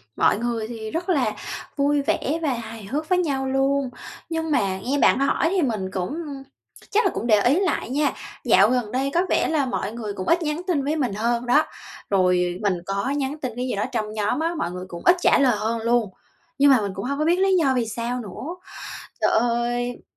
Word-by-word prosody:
Mọi - - +3
người 230 -1 -2
thì 220 -2 -6
rất 350 +3 -3
là 275 -11 +2 0.4
vui 285 0 +2
vẻ 285 +2 0
và 295 -5 +1
hài 225 -2 -7
hước 300 +9 -3
với 365 - +4
nhau 275 -6 -1
luôn, 270 0 +1 0.4
nhưng 325 -1 -2
mà 195 -9 +1
nghe 265 +8 -1
bạn - - +4
hỏi 275 +3 +2
thì 375 0 +1
mình 215 - -1
cũng 195 - -3 0.7
chắc 445 +3 +3
là - - +3
cũng - - -3
để 215 -3 +5
ý 265 - +3
lại 375 -10 0
nha, 290 +3 +1 0.3
dạo - - +5
gần 245 -4 0
đây 270 +2 0
có 345 - +3
vẻ - - +2
là 305 -4 +1
mọi 250 -5 -2
người 220 -3 -5
cũng 185 -2 -6
ít 340 +1 +3
nhắn 305 +1 -2
tin 315 -7 +1
với 295 +3 0
mình 260 -9 -1
hơn 235 +3 0
đó, 270 +6 +4 0.5
rồi 180 -2 +2
mình 200 -4 +1
có 200 +6 -1
nhắn 280 0 -1
tin 255 - -2
cái 250 +1 -2
gì 250 - -2
đó 205 - -1
trong 215 -4 -2
nhóm 210 +5 0
á, 330 +2 0
mọi 175 - -2
người 180 +1 -6
cũng 170 -2 -8
ít 355 - +7
trả - - +5
lời 255 -5 +4
hơn 225 +2 -1
luôn. 230 -2 +2 0.5
Nhưng 280 0 +6
mà 255 -4 +5
mình 200 -1 -2
cũng 195 - -4
hông 280 +2 -2
có 305 - +1
biết 345 +3 +3
lý 385 0 +4
do 280 -6 +3
vì 245 -2 +1
sao 235 +3 -3
nữa. 250 - -6 0.7
Trời - - +3
ơi, 240 +1 0
250 Hz, 230 wpm, -23 LUFS, 215-290 Hz, 0.7 s, ít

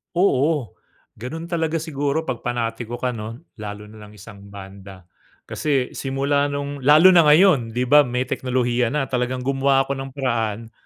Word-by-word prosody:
Oo, 150 - +1 0.5
ganun 160 +8 -7
talaga 165 -1 -1
siguro 145 0 -2
'pag 130 -5 -4
panatiko 120 -1 -3
ka 125 0 -2
'no? 115 +3 -8 0.2
Lalo 105 0 -7
na 110 0 -14
nang 105 - -16
isang 100 0 -13
banda. 95 -1 -12 0.4
Kasi 135 -4 -1
simula 140 +1 0
nung 140 0 -4
lalo 155 +6 +7
na 170 -2 +6
ngayon, 150 -8 +4
'di 125 - 0
ba 150 0 +7
may 125 +1 -1
teknolohiya 125 -2 -1
na. 135 -3 -1
Talagang 125 0 -2
gumawa 135 0 +2
ako 140 - -4
ng 135 0 -6
paraan 115 -4 -2
130 Hz, 160 wpm, -21 LUFS, 115-145 Hz, 0.5 s, lalo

